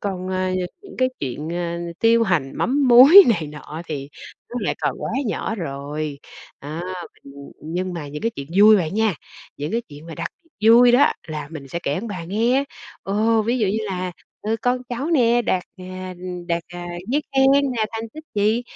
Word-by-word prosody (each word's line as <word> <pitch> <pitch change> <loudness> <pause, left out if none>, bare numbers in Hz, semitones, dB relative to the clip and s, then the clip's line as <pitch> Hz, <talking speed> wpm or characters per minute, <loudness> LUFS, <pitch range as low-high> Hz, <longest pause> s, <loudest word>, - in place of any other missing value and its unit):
còn, 185 -2 -4
à, 185 0 -1 0.3
những 395 - -12
cái 255 - +3
chuyện, 140 +4 -4
ờ, 170 0 -3 0.2
tiêu 230 0 +4
hành 165 -11 0
mắm 275 +1 +1
muối 270 +11 +10
này 170 -9 +1
nọ 150 +2 -8
thì 140 -3 -5 0.4
nó 245 - -6
lại 205 - -1
còn - - -1
quá - - -3 0.2
nhỏ 220 - -2
rồi, 145 -2 -5 0.4
đó, 155 +3 -5 0.4
ưm, 140 - -12 0.3
nhưng 180 +4 -3
mà 155 -4 -6
những 150 +1 -7
cái 230 - +1
chuyện 140 - -6
vui 215 +1 +8
bạn 175 -1 -1
nha, 220 -2 +2 0.4
những 145 +2 -4
cái 230 - +1
chuyện 150 +3 -12
mà 165 - -8
đặc - - -4 0.2
biệt 225 -10 -1
vui 240 +1 +7
đó, 270 +4 +5 0.2
là 150 -2 -5
mình 145 -4 -9
sẽ 170 - -3
kể 140 - -1
ông 210 +8 -4
bà 185 -5 -5
nghe. 230 +9 +1 0.4
Ồ, 220 +3 +2
ví 235 +4 0
dụ 215 - +2
như 200 +3 0
là, 185 -2 -3 0.3
ừ, 220 +2 0
con 250 0 +1
cháu 250 +4 -3
nè 240 -6 +3
đạt, 185 -4 0
à, 185 0 -7 0.3
đạt, 170 0 0
à, 175 0 -8 0.2
giấy 290 +5 +1
khen 265 0 +6 0.3
nè, 225 -3 0
thành 225 0 -5
tích 310 0 -9
gì, 215 +4 +2
190 Hz, 200 wpm, -22 LUFS, 165-230 Hz, 0.4 s, muối